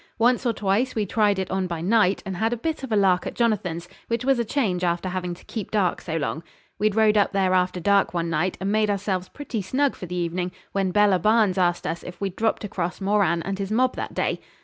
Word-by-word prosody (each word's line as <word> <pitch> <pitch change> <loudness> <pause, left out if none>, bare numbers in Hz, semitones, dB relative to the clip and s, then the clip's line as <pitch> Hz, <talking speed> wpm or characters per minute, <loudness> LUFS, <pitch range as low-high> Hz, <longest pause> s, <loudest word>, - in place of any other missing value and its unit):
Once 245 +2 +3
or - - +3
twice 210 +5 0
we 215 -2 0
tried 205 0 +2
it 190 -1 -3
on 190 -1 0
by 170 -2 -4
night, 195 +2 +2
and 190 -2 -4
had 225 +3 +1
a 240 - -1
bit 315 +6 -3
of 265 -3 -7
a - - +3
lark 190 -3 +3
at - - -6
Jonathan's, 180 -7 0 0.2
which 230 +1 -2
was 270 -2 +3
a - - +2
change 210 -7 -1
after 175 +1 0
having 180 -1 -3
to - - -18
keep 220 -4 -5
dark 200 -5 0
so 165 -2 -3
long. 160 +1 -2 0.4
We'd 210 -1 +1
rode 215 -1 +4
up 205 0 +2
there 190 -1 +2
after 180 0 +1
dark 200 +3 +3
one 170 -1 -1
night, 165 +3 -1
and 195 +1 -1
made 215 0 +2
ourselves 195 -2 -1
pretty 270 -7 -5
snug 265 +8 0
for 180 - -8
the 180 - -5
evening, 175 +1 -2 0.2
when 195 -1 0
Bella 205 -1 +4
Barnes 210 -1 +3
asked 175 -1 +1
us 165 +1 -3
if 180 - -9
we'd 195 -2 -3
dropped 225 0 0
across 180 -3 -3
Moran 195 -4 +1
and 195 +1 -4
his 195 -1 -3
mob 255 +3 +2
that - - -5
day. - - 0
195 Hz, 245 wpm, -24 LUFS, 180-220 Hz, 0.4 s, rode